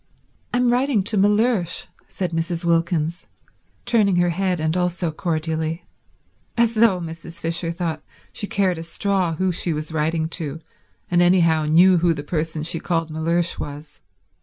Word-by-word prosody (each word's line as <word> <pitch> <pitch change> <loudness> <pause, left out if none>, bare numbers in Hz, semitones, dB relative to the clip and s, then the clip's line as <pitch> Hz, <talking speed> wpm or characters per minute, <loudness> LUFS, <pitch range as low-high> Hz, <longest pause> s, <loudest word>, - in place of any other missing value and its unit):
"I'm 245 0 +2
writing 250 -4 +2
to 210 +3 0
Mellersh," 205 -2 +2 0.2
said 185 -3 -4
Mrs. 165 +1 -2
Wilkins, 170 0 0 0.6
turning 215 -6 +3
her 175 0 +3
head 180 0 -1
and 160 +1 0
also 180 -1 -1
cordially—as 160 +8 -3
though, 220 -4 +4
Mrs. 165 0 -8
Fisher 165 +1 -1
thought, 165 -3 -3 0.3
she 205 - -3
cared 185 -5 0
a - - -5
straw 180 0 -1
who 185 +3 0
she 170 -1 0
was 155 +1 -4
writing 160 +1 0
to 160 -3 -4 0.5
and 175 0 +4
anyhow 170 -3 +4
knew 175 +4 +5
who 170 -1 +2
the 145 - -6
person 155 0 -3
she 165 +1 +1
called 165 -2 -1
Mellersh 165 +2 0
was. 145 +1 -8
170 Hz, 150 wpm, -22 LUFS, 160-185 Hz, 0.6 s, knew